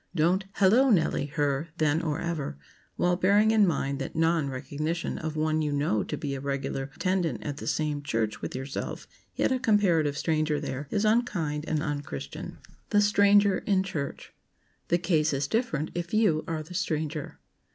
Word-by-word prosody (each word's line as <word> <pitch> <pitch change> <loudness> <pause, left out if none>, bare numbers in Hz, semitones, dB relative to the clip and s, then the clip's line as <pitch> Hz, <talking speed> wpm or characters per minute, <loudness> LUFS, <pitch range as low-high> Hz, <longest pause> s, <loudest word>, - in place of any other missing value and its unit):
Don't 180 +4 +2
"Hello, 220 +8 +5
Nellie!" 160 - +2
her, 145 0 -1
then 155 0 +2
or 160 -2 -2
ever, 165 - -3 0.4
while 180 0 +2
bearing 200 +4 +4
in 215 -3 +5
mind 140 -4 -1
that 135 - -5
non 160 -2 +2
recognition 150 +5 -3
of 160 -1 -4
one 155 0 +1
you 150 -1 -1
know 145 -7 +1
to - - -4
be 140 -2 -3
a 135 - -3
regular 135 0 -3
attendant 180 -8 -1
at 145 -1 -4
the - - -7
same 150 -2 -1
church 115 -6 -2
with - - -5
yourself, 135 +2 -5 0.3
yet - - +1
a 260 - +1
comparative 185 - +2
stranger 155 -2 0
there, 140 -1 -5
is 210 +1 0
unkind 180 -10 +1
and 155 -1 0
un 145 -2 -2
Christian. 70 - -7
[Sidenote: - - -15
THE 205 - +4
STRANGER 205 -1 +5
IN 190 -2 +1
CHURCH] 155 -7 -5 0.5
The 175 - +3
case 160 -3 +1
is 135 +1 0
different 160 - -1
if 175 +3 -3
you 200 -8 +3
are 160 -1 -2
the 170 +4 -11
stranger. 155 -3 -3
155 Hz, 180 wpm, -27 LUFS, 145-190 Hz, 0.5 s, Hello